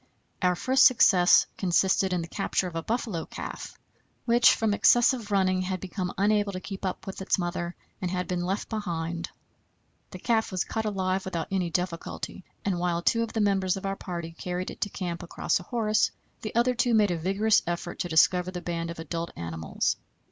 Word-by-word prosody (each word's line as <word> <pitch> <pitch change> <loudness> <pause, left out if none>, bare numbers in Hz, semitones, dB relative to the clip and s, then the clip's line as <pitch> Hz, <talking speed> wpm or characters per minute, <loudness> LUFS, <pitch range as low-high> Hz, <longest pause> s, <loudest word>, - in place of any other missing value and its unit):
Our 180 -1 +3
first 260 +8 +4
success 190 -8 +6
consisted 190 +1 +2
in 180 -2 0
the - - -7
capture 195 +1 -1
of 170 - -8
a 165 - -1
buffalo 215 -4 -2
calf, - - -7 0.5
which 240 0 +6
from 220 -2 +1
excessive 240 +1 +4
running 185 -2 +2
had 185 0 -2
become 185 0 -4
unable 205 +1 +2
to 185 - -4
keep 195 +1 -7
up 185 - -3
with 195 0 -6
its 190 - +1
mother, 175 -1 -3 0.3
and 180 - -1
had 180 0 -2
been 180 -1 -1
left 190 +3 -2
behind. 170 -6 -3 0.8
The - - -8
calf 225 -3 0
was 185 -2 0
caught 220 -1 -3
alive 190 -2 -1
without 170 -2 -4
any 185 -3 0
difficulty, 175 +1 -4 0.2
and 190 -3 0
while 175 -1 0
two 230 - +3
of 230 -1 -3
the 225 - 0
members 195 -2 +2
of 195 - -6
our 195 0 -1
party 170 -3 -6
carried 180 +2 -4
it - - -12
to 205 - 0
camp 175 -3 -4
across 170 - -1
a - - -9
horse, 215 -3 +2 0.3
the 215 - -6
other 240 +2 +3
two 240 -1 +2
made 210 -3 +4
a 175 - -1
vigorous 195 +5 +3
effort 175 0 -4
to 175 - -2
discover 180 +3 +4
the 180 -1 -5
band 170 -1 -3
of 170 - -6
adult 165 +1 -4
animals. 80 -2 -2
185 Hz, 200 wpm, -27 LUFS, 175-205 Hz, 0.8 s, success